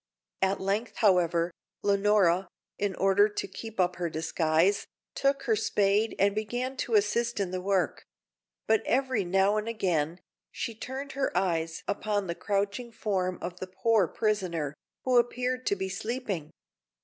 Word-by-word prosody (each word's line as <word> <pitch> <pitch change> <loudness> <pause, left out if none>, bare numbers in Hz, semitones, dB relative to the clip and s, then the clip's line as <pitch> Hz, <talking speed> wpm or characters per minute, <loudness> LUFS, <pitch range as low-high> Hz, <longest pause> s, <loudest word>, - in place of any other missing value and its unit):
At 190 +1 +2
length, 200 +5 -1
however, 175 -5 +3 0.3
Leonora, 200 -3 +3 0.3
in 200 -2 0
order 195 +2 +4
to 205 - -4
keep 225 +2 -9
up 180 -1 +2
her 175 -2 -1
disguise, 160 +4 +1 0.3
took 275 0 +1
her 230 -4 +2
spade 210 0 +2
and 200 +1 +3
began 245 +5 -2
to 235 -3 0
assist 230 +3 +2
in 190 -3 -1
the 185 0 -3
work; 190 -1 0 0.6
but 220 -1 +3
every 260 -4 +1
now 195 +3 +3
and 215 +1 -2
again, 175 -7 0 0.3
she 230 - -4
turned 265 +5 -6
her 275 0 -1
eyes 165 -3 0
upon 205 0 -1
the 170 - -2
crouching 205 +6 -2
form 190 -5 -1
of 175 +1 -5
the 185 - -5
poor 190 +1 +2
prisoner, 180 -10 -1 0.3
who 255 -2 +5
appeared 250 +1 -1
to 200 - +3
be 190 -1 -3
sleeping. 200 - -3
200 Hz, 150 wpm, -29 LUFS, 185-225 Hz, 0.6 s, who